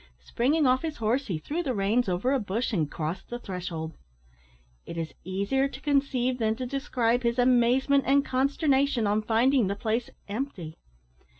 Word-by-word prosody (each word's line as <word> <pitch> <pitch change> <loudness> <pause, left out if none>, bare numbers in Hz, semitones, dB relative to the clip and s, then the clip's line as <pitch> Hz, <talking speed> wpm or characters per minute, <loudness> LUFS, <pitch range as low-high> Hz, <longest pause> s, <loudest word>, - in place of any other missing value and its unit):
Springing 290 +6 +1
off 255 0 +3
his 315 -2 -4
horse, 235 +5 0
he 180 - -2
threw 300 - -3
the 265 -7 -2
reins 205 +3 +1
over 185 +9 0
a 275 - +2
bush 220 +3 -2
and 160 -7 0
crossed 165 +4 -5
the 240 - -4
threshold. 175 -7 -5 0.9
It 170 - -8
is 165 -1 -4
easier 200 +9 0
to 270 - -10
conceive 270 -3 0
than 220 -1 +1
to 255 +2 -4
describe 250 -3 0
his 235 0 0
amazement 255 +3 +3
and 280 +1 +4
consternation 275 -2 +1
on 205 +1 +2
finding 235 +2 +3
the 200 - -1
place 225 +2 -2 0.2
empty. 200 - -5
240 Hz, 170 wpm, -27 LUFS, 200-270 Hz, 0.9 s, and